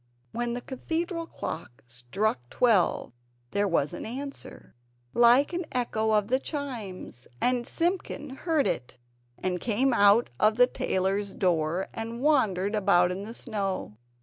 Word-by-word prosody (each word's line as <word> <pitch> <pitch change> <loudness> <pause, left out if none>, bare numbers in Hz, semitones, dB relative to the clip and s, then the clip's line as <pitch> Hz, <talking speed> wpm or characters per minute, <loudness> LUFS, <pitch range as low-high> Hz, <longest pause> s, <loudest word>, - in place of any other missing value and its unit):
When 240 0 -2
the 245 - -4
Cathedral 330 +6 -3
clock 120 - -7
struck 125 - -2
twelve 220 - +2 0.4
there 200 0 +1
was 165 -5 +1
an - - -6
answer 275 +5 -7 0.4
like 245 +7 +5
an 355 +1 -1
echo 220 -3 0
of 210 -1 +2
the 260 +1 +3
chimes 230 - -6
and 245 -1 +1
Simpkin 335 -5 -2
heard 310 +1 0
it, 125 - -3 0.4
and 180 -1 -2
came 245 +3 +1
out 205 +1 +5
of 215 +1 +4
the 245 - +7
tailor's 195 -3 -1
door, 175 0 +1
and 230 +1 -5
wandered 215 -9 +2
about 180 -4 +3
in 195 +2 -4
the 225 - -7
snow. 195 - -3
220 Hz, 140 wpm, -27 LUFS, 185-255 Hz, 0.4 s, the